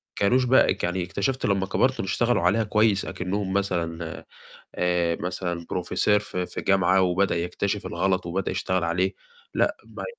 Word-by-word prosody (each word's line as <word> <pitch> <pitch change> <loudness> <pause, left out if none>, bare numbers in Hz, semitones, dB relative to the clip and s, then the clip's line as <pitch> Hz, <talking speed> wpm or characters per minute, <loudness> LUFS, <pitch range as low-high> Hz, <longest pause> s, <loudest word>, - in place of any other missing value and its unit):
كانوش 125 +6 +3
بقى 130 +2 +4
يعني 90 +1 0
اكتشفت 130 +10 -2
لمّا 100 -1 +1
كبرت 130 +7 +1
إنه 95 - -2
اشتغلوا 120 +1 +2
عليها 100 +6 +3
كويس 105 -1 +2
أكنهم 95 +1 -3
مثلًا 85 -4 -2 0.5
آآ 85 -1 +1
مثلًا 90 -1 -3
Professor 105 +3 +2
في 90 -3 -4
في - - -6
جامعة 95 -1 +3
وبدأ 90 0 +1
يكتشف 95 +3 -2
الغلط، 95 +1 0
وبدأ 90 +3 -2
يشتغل 95 -2 -1
عليه، 90 +3 0 0.4
لأ، - - +1
ما - - -8
95 Hz, 155 wpm, -25 LUFS, 90-100 Hz, 0.5 s, بقى